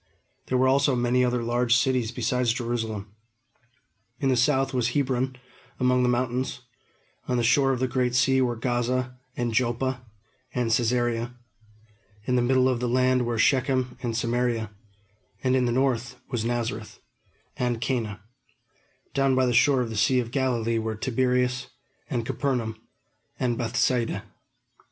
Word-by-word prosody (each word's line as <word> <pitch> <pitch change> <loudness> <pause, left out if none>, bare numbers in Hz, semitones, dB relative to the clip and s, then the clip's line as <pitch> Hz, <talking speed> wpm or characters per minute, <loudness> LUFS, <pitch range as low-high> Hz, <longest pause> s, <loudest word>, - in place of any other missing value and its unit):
There 130 - +1
were 130 +1 +3
also 140 0 +3
many 120 +1 +2
other 125 -1 0
large 120 +1 +2
cities 125 -3 +1
besides 125 -1 0
Jerusalem. 115 -4 -3 1.1
In 135 - +1
the 130 - +3
south 135 +2 +2
was 125 -2 +1
Hebron 130 -2 0 0.4
among 125 0 +3
the 125 - +2
mountains; 125 +1 -1 0.7
on 125 - 0
the 120 - +1
shore 135 +3 +4
of 130 - -1
the 130 - +1
Great 125 0 0
Sea 130 +1 +3
were 120 -2 +1
Gaza, 125 +1 -1 0.2
and 120 -2 -1
Joppa, 125 +2 0 0.5
and 120 -2 0
Cæsarea; 120 0 0 0.9
in 125 - +1
the 125 - +3
middle 130 +1 +3
of 130 -2 +1
the 125 0 -1
land 125 0 +2
were 120 -1 -1
Shechem 130 +1 +2
and 115 -3 -2
Samaria; 120 -2 -1 0.7
and 130 0 +2
in 130 -1 +2
the 120 - +1
north 125 -1 0
were 120 - -1
Nazareth, 115 -2 -3 0.6
and 120 -2 -1
Cana; 110 -5 -2 0.9
down 135 -1 +2
by 130 0 +3
the 125 - +1
shore 130 +2 +4
of 115 -2 -3
the - - -5
Sea 130 +5 +3
of 115 -2 -3
Galilee 120 -4 0
were 110 0 -3
Tiberias, 125 +1 0 0.4
and 115 -2 -2
Capernaum, 120 -5 -1 0.6
and 120 -2 +1
Bethsaida. 115 -2 0
125 Hz, 150 wpm, -26 LUFS, 120-130 Hz, 1.1 s, shore